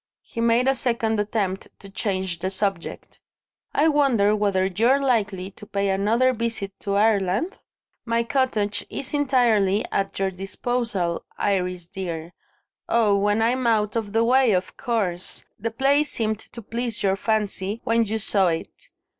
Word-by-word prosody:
He 230 - -5
made 235 +2 +3
a 270 - +5
second 230 -4 0
attempt 205 -2 -1
to 200 - -13
change 190 -3 -2
the 185 - -1
subject. 195 -2 -4 0.5
"I 305 - +3
wonder 255 -9 +3
whether 200 -3 +1
you're 230 +9 +3
likely 210 -8 0
to 210 +2 -13
pay 200 0 -1
another 220 +7 +2
visit 230 -4 -3
to 200 0 -2
Ireland? 205 - +1 0.4
My 230 0 +1
cottage 230 -6 0
is 275 - -5
entirely 235 -8 +2
at 195 0 -1
your 195 0 0
disposal, 195 -1 -2
Iris 180 -3 -1
dear. 175 -3 -5 0.6
Oh, 220 -3 +3
when 205 +2 +2
I'm 245 +2 +1
out 210 -2 +2
of 220 -3 -2
the 225 +2 +2
way, 250 -1 +4
of 185 0 -1
course! 190 -7 -2
The 230 +3 -2
place 275 +5 +2
seemed 220 -2 -1
to 235 +1 -11
please 230 0 -3
your 195 -1 +3
fancy, 210 0 -1
when 230 0 +2
you 220 0 -2
saw 195 -3 +2
it. 165 -1 -4
210 Hz, 155 wpm, -24 LUFS, 195-235 Hz, 0.6 s, a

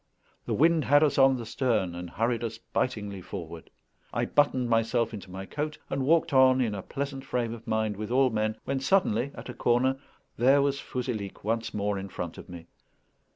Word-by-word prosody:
The - - 0
wind 160 +1 +3
had 145 +2 +5
us 145 -2 +2
on 135 -1 +6
the 120 - -6
stern, 110 -6 0
and 90 0 -6
hurried 115 +5 -1
us 115 -1 -4
bitingly 105 -4 -3
forward. 85 -3 -8 0.4
I - - 0
buttoned 130 -4 +2
myself 115 0 +1
into 100 -3 -8
my 95 +1 -7
coat, 150 +7 -4
and 135 - -1
walked 165 +3 +2
on 130 -1 +6
in 115 -5 +1
a 100 - -4
pleasant 135 +4 -5
frame 120 -2 -2
of 115 +1 -11
mind 110 -2 0
with 105 +1 -5
all 130 +1 +3
men, 110 0 -1
when 135 0 -1
suddenly, 135 - +2
at - - -9
a - - -5
corner, 130 +3 +1 0.4
there 135 +4 +5
was 140 0 0
Fouzilhic 120 -6 -4
once 115 +2 -1
more 100 -1 -1
in 95 0 -7
front 85 -3 -6
of - - -12
me. 85 -2 -9
120 Hz, 200 wpm, -28 LUFS, 105-135 Hz, 0.4 s, on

